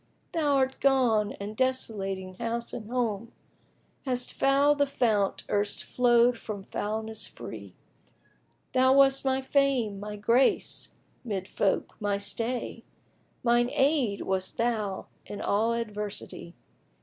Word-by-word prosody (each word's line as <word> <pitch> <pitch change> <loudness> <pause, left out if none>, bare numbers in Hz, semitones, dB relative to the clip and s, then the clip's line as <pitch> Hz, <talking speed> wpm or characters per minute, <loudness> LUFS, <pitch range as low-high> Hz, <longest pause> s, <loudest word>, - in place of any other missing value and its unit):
Thou 290 -4 +2
'rt 260 0 -4
gone 240 -7 +3
and, 205 +2 -7
desolating 200 -7 -2
house 235 +1 -3
and 215 -2 -6
home, 235 -2 -2 0.4
* - - -39
Hast 250 -1 -1
fouled 280 +2 +3
the 285 - +3
fount 215 -7 +1
erst 205 0 0
flowed 240 -1 +3
from 205 -3 -6
foulness 220 +2 -2
free: - - -9 1.0
Thou 260 +1 +5
wast 270 0 +5
my 265 0 0
fame, 265 -7 +1
my 210 +1 -6
grace 230 +6 +2 0.3
'mid 195 -6 -3
folk, 195 -2 -1
my 205 -1 0
stay; 230 +3 -2 0.3
* - - -39
Mine 240 0 +3
aid 275 -7 +2
wast 190 -1 -2
thou 220 -5 -1 0.2
in 205 - -6
all 220 +3 +1
adversity! 210 -6 -5
230 Hz, 125 wpm, -28 LUFS, 205-260 Hz, 1.0 s, Thou